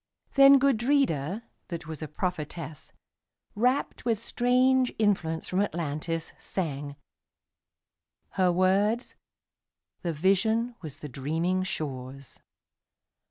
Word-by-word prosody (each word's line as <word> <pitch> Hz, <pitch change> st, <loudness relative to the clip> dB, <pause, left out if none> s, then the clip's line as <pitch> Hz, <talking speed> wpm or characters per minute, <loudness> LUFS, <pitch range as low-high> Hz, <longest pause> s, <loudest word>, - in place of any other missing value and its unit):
Then 275 Hz, 0 st, +8 dB
Gudrida, 235 Hz, -, +1 dB, 0.2 s
that 170 Hz, -4 st, -6 dB
was 160 Hz, -1 st, -7 dB
a 155 Hz, -, -4 dB
prophetess, 155 Hz, -1 st, -5 dB, 0.6 s
Rapt 250 Hz, +6 st, 0 dB
with 230 Hz, -2 st, +1 dB
strange 250 Hz, +2 st, +2 dB
influence 180 Hz, -7 st, 0 dB
from 185 Hz, +2 st, +1 dB
Atlantis, 165 Hz, -2 st, -3 dB
sang:Her 145 Hz, +4 st, -6 dB
words: 195 Hz, +6 st, +2 dB, 0.9 s
the 170 Hz, -, -1 dB
vision 220 Hz, +9 st, +2 dB
was 155 Hz, -3 st, -9 dB
the 150 Hz, -, -5 dB
dreaming 160 Hz, +8 st, -1 dB
shore's. 135 Hz, -6 st, -5 dB
180 Hz, 90 wpm, -28 LUFS, 155-230 Hz, 0.9 s, Then